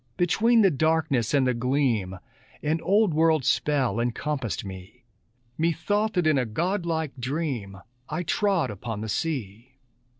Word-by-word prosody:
Between 225 +6 +3
the 195 - +5
darkness 155 -5 +1
and 140 -3 +3
the 125 - +2
gleam 120 -6 0 0.5
An 160 +2 0
old 200 -2 +3
world 160 -3 +3
spell 130 -4 +1
encompassed 120 -1 -2
me: 95 +5 -10 0.6
Methought 190 +7 0
that 180 -3 +1
in 155 -3 +3
a 125 - 0
godlike 165 - -1
dream 125 -7 -3 0.3
I 180 - -2
trod 195 - +1
upon 105 +1 -6
the 110 - -5
sea. 125 -2 -4
145 Hz, 135 wpm, -26 LUFS, 120-165 Hz, 0.6 s, the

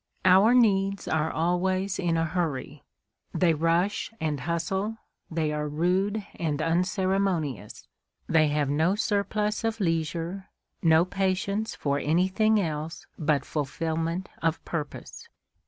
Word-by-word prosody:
Our 195 +6 +6
needs 195 -4 +2
are 160 0 +1
always 185 +4 0
in 170 -2 +1
a 165 - +1
hurry. 155 -4 -3 0.5
They 175 -3 +3
rush 170 +8 0
and 150 -3 -1
hustle, 175 - -2 0.3
they 160 -2 -1
are 150 0 -2
rude 190 +7 0
and 155 -3 -1
unceremonious; 180 - -1 0.4
they 160 -1 +4
have 145 -1 0
no 160 +7 +2
surplus 210 0 0
of 225 0 -1
leisure, 165 +1 -2 0.3
no 160 0 +5
patience 195 +3 -1
for 140 -1 -1
anything 190 +8 +2
else 160 -3 -3
but 150 -3 +1
fulfilment 165 +4 -2
of 165 0 -1
purpose. 150 -4 -6
170 Hz, 120 wpm, -27 LUFS, 155-195 Hz, 0.5 s, Our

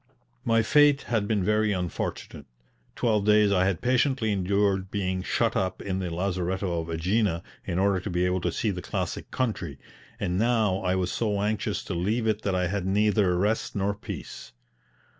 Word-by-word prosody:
My 115 0 +3
fate 145 +3 +4
had 110 -4 -1
been 105 -3 +1
very 105 +1 +2
unfortunate; 90 -3 -4 0.5
twelve 110 -4 +1
days 105 0 +4
I 95 -1 +3
had 95 -2 0
patiently 125 -2 +2
endured 100 0 +1
being 95 -2 -2
shut 115 +4 0
up 95 0 -1
in 95 -1 -3
the 90 -2 -3
lazaretto 90 -1 -2
at 80 - -3
AEgina, 95 -1 +1 0.2
in 85 - -2
order 95 0 +2
to 95 - -5
be 90 0 +1
able 90 0 0
to - - 0
see 110 - -1
the 90 -2 -5
classic - - -4
country, 100 - -2 0.4
and 90 +1 -1
now 110 -4 +2
I 90 -1 0
was 90 -1 -1
so 105 -3 -1
anxious 105 0 -1
to - - -5
leave 105 +7 0
it 110 -1 +1
that 100 -3 -1
I 90 0 +1
had 95 +2 -2
neither 100 -2 +2
rest 105 +5 0
nor 100 0 0
peace. 100 - -8
100 Hz, 180 wpm, -26 LUFS, 90-110 Hz, 0.5 s, fate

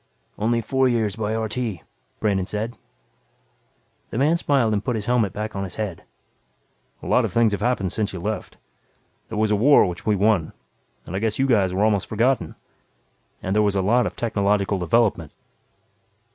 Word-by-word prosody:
"Only 115 +2 +1
four 130 +3 +1
years 110 -5 0
by 110 0 -2
RT," 110 +1 -3 0.6
Brandon 95 -3 0
said. 110 +3 -4 1.3
The - - -5
man 150 +6 +3
smiled 135 -9 +1
and 105 -1 -1
put 125 - -1
his 105 -2 -4
helmet 120 -5 +1
back 105 +2 -5
on 95 - -2
his 95 - -7
head. 105 -6 -4 1.0
"A - - -8
lot - - +3
of - - -2
things 115 -2 +3
have 100 - -3
happened 110 -7 0
since 105 -2 -2
you 95 - -6
left. 105 +5 -4 0.7
There 110 - -5
was 110 0 +1
a - - +4
war 135 +8 +5
which 90 -3 -5
we 105 - +2
won, 100 -5 +1 0.5
and 90 - -6
I - - 0
guess 110 0 -1
you 135 - +2
guys 105 -8 +2
were 95 +3 0
almost 105 -3 +1
forgotten. 115 -5 0 0.9
And 95 +2 -1
there 105 - +4
was 100 -1 +1
a 95 - +1
lot 120 +3 +3
of - - -7
technological 100 -3 0
development." 95 -4 +1
105 Hz, 185 wpm, -23 LUFS, 100-115 Hz, 1.3 s, war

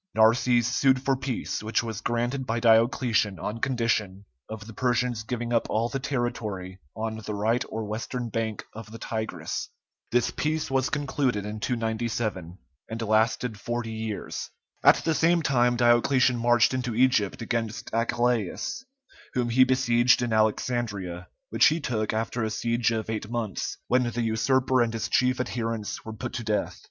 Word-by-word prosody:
Narses 115 +2 +4
sued 130 +2 +2
for 135 0 +2
peace, 130 -2 -3
which 110 +2 0
was 110 -2 -5
granted 120 +3 -1
by 115 +1 0
Diocletian 115 -3 +3
on 105 +6 -4
condition 115 -6 -1 0.2
of 110 -1 -7
the 115 - -10
Persians 125 -1 0
giving 120 +1 -3
up 115 - +1
all 115 +2 0
the 135 - -3
territory 110 -8 -3 0.2
on 110 0 -3
the 105 -1 -5
right 115 +5 +1
or 110 0 -4
western 115 +3 -4
bank 110 -1 -2
of 110 -1 -9
the 115 - -8
Tigris. 110 0 -4 0.4
This 120 0 +2
peace 155 -1 -2
was 135 0 +1
concluded 135 -7 -1
in 105 +1 -5
297, 110 -6 -2 0.3
and 115 +1 -5
lasted 110 +1 +1
forty 120 +1 -3
years. 110 -1 -5 0.3
At - - +8
the 165 - +2
same 170 +1 +3
time 120 -4 +3
Diocletian 125 +2 +4
marched 120 +1 +3
into 125 -3 -2
Egypt 120 -4 +2
against 115 -1 -3
Achillæus, 120 - 0 0.5
whom 120 -1 +1
he 130 +3 +6
besieged 125 -2 +3
in 120 -2 -1
Alexandria, 105 -5 -1 0.2
which - - +6
he 160 +2 +2
took 110 -7 -1
after 115 +2 -2
a 110 - 0
siege 115 +2 0
of 110 -2 -2
eight 110 -1 -4
months, 115 -5 -3
when 125 -1 +2
the 120 0 -2
usurper 125 +3 +2
and 115 -1 +1
his 115 - -2
chief 125 0 +2
adherents 115 -4 -3
were 110 - -7
put 120 +2 -6
to 120 - -4
death. 105 -1 -1
115 Hz, 165 wpm, -26 LUFS, 110-125 Hz, 0.5 s, At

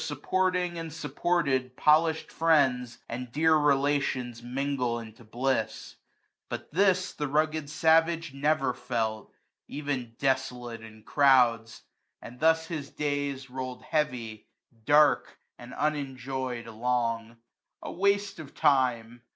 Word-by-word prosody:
Supporting 180 -2 -1
and 165 -1 -6
supported, 145 -4 -1
polished 160 +1 +3
friends^ 130 -7 +2
And 125 +1 -6
dear 160 +4 +3
relations 140 -4 +1
mingle 125 -1 -2
into 115 0 -10
bliss. 120 0 -2 0.5
But - - -6
this 185 0 +2
the 150 - -3
rugged 155 +1 0
savage 165 0 +2
never 140 -2 +1
felt> 115 -4 -3 0.4
£T*n 135 -5 -4
desolate 125 -4 -2
in 110 -1 -13
crowds; 120 -5 +3 0.4
and 125 +2 -11
thus 160 +1 +3
his 155 -4 -5
days 145 -2 -2
70 130 -2 -17
'Roird 130 -1 -6
heavy, 125 -8 -2 0.4
dark, 150 +3 +4 0.2
and 120 +1 -11
unenjoy'd 130 -4 -3
along: 115 0 -2 0.5
A - - -5
waste 200 +2 0
of 150 -3 -10
time 120 -3 +1
135 Hz, 115 wpm, -28 LUFS, 120-155 Hz, 0.5 s, dark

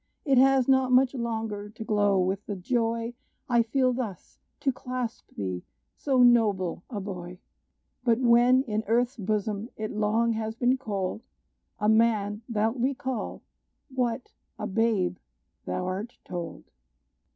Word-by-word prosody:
It 270 -3 +5
has 265 -1 +5
not 265 -1 +4
much 255 +1 +5
longer 220 -4 -3
to 220 +1 -8
glow 205 -2 +2
with 190 +2 -1
the 205 - -3
joy 230 +3 -1 0.3
I 240 -3 +4
feel 255 +2 +2
thus 230 -7 -6 0.2
to 275 - +2
clasp 250 -2 -5
thee, 95 -3 -3 0.3
so 265 -3 +3
noble 210 -8 +3
a 220 -6 -4
boy! 180 -2 -6 0.7
But 235 -2 +3
when 245 +1 +5
in 215 -3 -2
earth's 240 +4 +2
bosom 210 +1 -2
it 215 0 -3
long 220 +2 +1
has 220 0 -3
been 245 +2 +3
cold, 200 -4 -3 0.6
A 210 - 0
man, 220 -2 +3
thou'lt 225 +3 +1
recall, 260 -2 -2 0.5
what, 250 -1 -1 0.3
a - - -4
babe, 200 -4 +1 0.5
thou 180 - -2
art 195 +6 -4
told." 175 -2 -6
225 Hz, 140 wpm, -27 LUFS, 205-245 Hz, 0.7 s, It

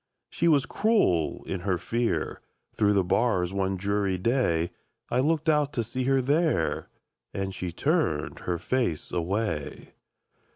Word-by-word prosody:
She 170 - +1
was 145 -4 +4
cruel 200 - +1
in 95 - -3
her 95 0 0
fear; 115 +6 -1 0.3
Through 105 -1 +3
the 100 -2 +3
bars 90 -2 +1
one 95 -1 0
dreary 100 0 0
day, 90 -6 +1 0.4
I 125 - +2
looked 155 +3 +1
out 150 -2 +2
to 120 - 0
see 125 +3 -3
her 135 0 +2
there, 155 +4 +1 0.5
And 95 0 -2
she 90 -2 -4
turned 140 - 0
her 90 -1 -2
face 120 -5 -1
away! 90 -3 -2
105 Hz, 140 wpm, -27 LUFS, 90-135 Hz, 0.5 s, was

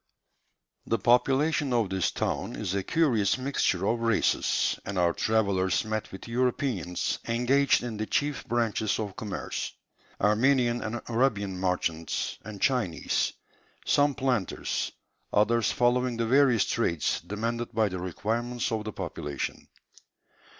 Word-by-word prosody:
The 115 - +2
population 135 +6 +2
of 115 -5 +1
this 95 -1 +1
town - - -2
is 90 - -3
a 100 - 0
curious 115 - +2
mixture 130 -8 0
of 115 +3 +1
races, 115 -2 +1
and 100 -1 -5
our 85 -1 +3
travellers 100 -2 +1
met 110 0 -3
with 95 - -9
Europeans 120 - -1
engaged 125 +5 +3
in 115 -3 -4
the 110 0 -3
chief 145 -1 0
branches 115 -3 0
of 105 -3 -4
commerce; 105 -3 -4 0.5
Armenian 120 +3 +3
and 115 +2 -4
Arabian 115 -5 +1
merchants, 85 -3 -1
and 105 -1 -8
Chinese; 110 - 0 0.5
some 145 -1 +3
planters, 125 -8 -1 0.4
others 115 +2 +3
following 125 -1 +1
the 115 - 0
various 130 -2 +4
trades 85 -9 0
demanded 115 +3 -3
by 110 -2 +2
the 95 -2 -4
requirements 115 +7 -2
of 110 -1 -1
the 110 - -3
population. 70 -2 -5
115 Hz, 130 wpm, -28 LUFS, 100-125 Hz, 0.5 s, various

